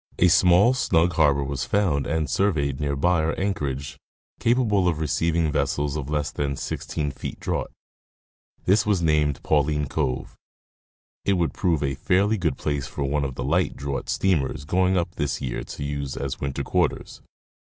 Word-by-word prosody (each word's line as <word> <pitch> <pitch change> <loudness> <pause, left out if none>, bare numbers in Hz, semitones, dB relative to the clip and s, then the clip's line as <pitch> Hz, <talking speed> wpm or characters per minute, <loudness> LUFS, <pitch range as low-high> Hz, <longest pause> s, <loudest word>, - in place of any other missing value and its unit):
A 90 - +5
small, 90 +7 +5
snug 90 -9 +2
harbor 70 -3 +3
was 70 -1 -3
found 90 -9 +1
and 80 0 0
surveyed 70 -4 0
near 70 -1 -1
by 85 +4 +2
our 80 - -1
anchorage, 70 -9 -3 0.4
capable 115 -6 +2
of 85 -3 +1
receiving 80 +2 0
vessels 70 0 0
of 70 -2 -4
less 75 -1 -1
than 70 -1 -2
16 75 +2 -3
feet 65 - -7
draught; - - -2 1.0
this 95 +2 +4
was 100 -5 +1
named 75 -3 +1
Pauline 75 0 +1
cove. 65 -2 -2 0.9
It 100 - +2
would 85 -3 0
prove 85 -6 0
a 70 -1 0
fairly 100 +9 +1
good 85 -4 0
place 70 -3 -2
for 70 - -4
one 70 +1 0
of 65 -2 -3
the - - -4
light 85 +7 +1
draught 70 0 -4
steamers 75 -7 0
going 95 +3 +2
up 85 -1 -1
this 70 -4 -1
year 65 -3 -3
to - - -7
use 70 -1 -4
as 70 0 -4
winter 70 -1 -2
quarters. - - -1
75 Hz, 170 wpm, -24 LUFS, 70-90 Hz, 1.0 s, A